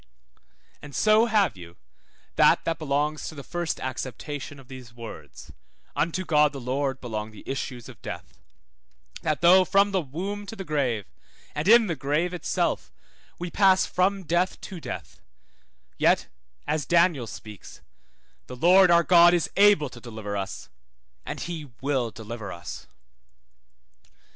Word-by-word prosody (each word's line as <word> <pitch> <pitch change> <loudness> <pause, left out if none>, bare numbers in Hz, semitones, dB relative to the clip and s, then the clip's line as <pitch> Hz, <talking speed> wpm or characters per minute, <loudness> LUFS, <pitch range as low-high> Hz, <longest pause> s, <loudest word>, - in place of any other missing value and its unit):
And 145 -1 -10
so 215 +2 +4
have 205 - +2
you 85 -2 -12 0.6
that - - +4
that 165 -2 -1
belongs 150 0 -1
to 160 - -7
the 140 - -8
first 175 0 -3
acceptation 135 +2 -5
of 135 - -15
these 130 -3 -11
words 80 - -10 0.4
(unto 170 +4 -1
God 150 -2 +3
the 140 - -6
Lord 135 +1 -2
belong 110 -3 -5
the 105 -2 -15
issues 130 -3 -5
of - - -13
death); - - -8 0.8
That 155 -1 -1
though 180 +2 +7
from 200 +2 +3
the 190 -2 +1
womb 195 +8 -5
to 225 - -7
the 195 - -6
grave, 135 - -1 0.5
and - - -3
in 230 +1 +7
the 170 -5 -2
grave 150 +6 -1
itself, 180 - -1 0.5
we 175 0 -5
pass 190 -1 +4
from 190 +2 0
death 175 +3 0
to 185 -3 -8
death, - - -8 0.8
yet, - - +3 0.4
as 150 0 -1
Daniel 170 -8 +3
speaks, 105 -2 -11 0.7
the 125 - -8
Lord 180 +7 +6
our 170 0 +5
God 175 0 +7
is 170 - -1
able 200 -8 +5
to 120 - -12
deliver 110 -3 -6
us, 100 -1 -5 0.6
and - - -5
he 160 -4 -6
will 135 -4 0
deliver 110 -2 -8
us. 85 0 -8
150 Hz, 150 wpm, -26 LUFS, 125-180 Hz, 0.8 s, though